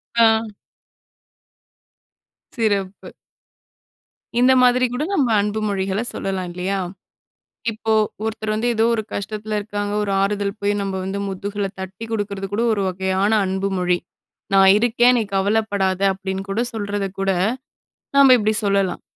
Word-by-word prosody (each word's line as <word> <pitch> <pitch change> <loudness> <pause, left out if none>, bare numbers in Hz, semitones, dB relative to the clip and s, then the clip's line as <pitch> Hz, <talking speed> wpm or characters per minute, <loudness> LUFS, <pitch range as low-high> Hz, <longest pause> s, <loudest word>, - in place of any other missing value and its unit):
ஆ. 225 -1 +3 2.0
சிறப்பு. 200 -5 -2 1.3
இந்த 250 +1 +5
மாதிரி 250 0 +4
கூட 255 +4 -1
நம்ம 285 -10 +2
அன்பு 210 +1 -2
மொழிகள 195 0 -1
சொல்லலாம் 190 -2 -3
இல்லையா? 185 +3 -2 0.9
இப்போ 220 0 -1 0.3
ஒருத்தர் 220 -1 -3
வந்து 220 +3 -1
ஏதோ 220 +1 +3
ஒரு 220 - -2
கஷ்டத்தில 215 +1 -3
இருக்காங்க, 205 0 -4
ஒரு 200 - -2
ஆறுதல் 200 +1 -1
போய் 205 0 +1
நம்ம 195 -1 -3
வந்து 195 +1 -3
முதுகுல 200 +1 -3
தட்டிக் 190 +4 -7
குடுக்கிறது 200 -2 -3
கூட, 225 +3 +1
ஒரு 200 -2 -1
வகையான 190 +2 0
அன்பு 190 +1 -1
மொழி. 180 0 +2 0.6
நான் 195 0 +7
இருக்கேன் 240 +2 +4
நீ - - +1
கவலப்படாதே, 200 -2 +1
அப்டின்னு 190 0 -5
கூட 205 - -1
சொல்றத 205 -2 -2
கூட 195 - 0 0.9
நாம 275 -2 +8
இப்டி 215 0 +1
சொல்லலாம். 195 -2 +1
205 Hz, 130 wpm, -21 LUFS, 195-220 Hz, 2.0 s, நாம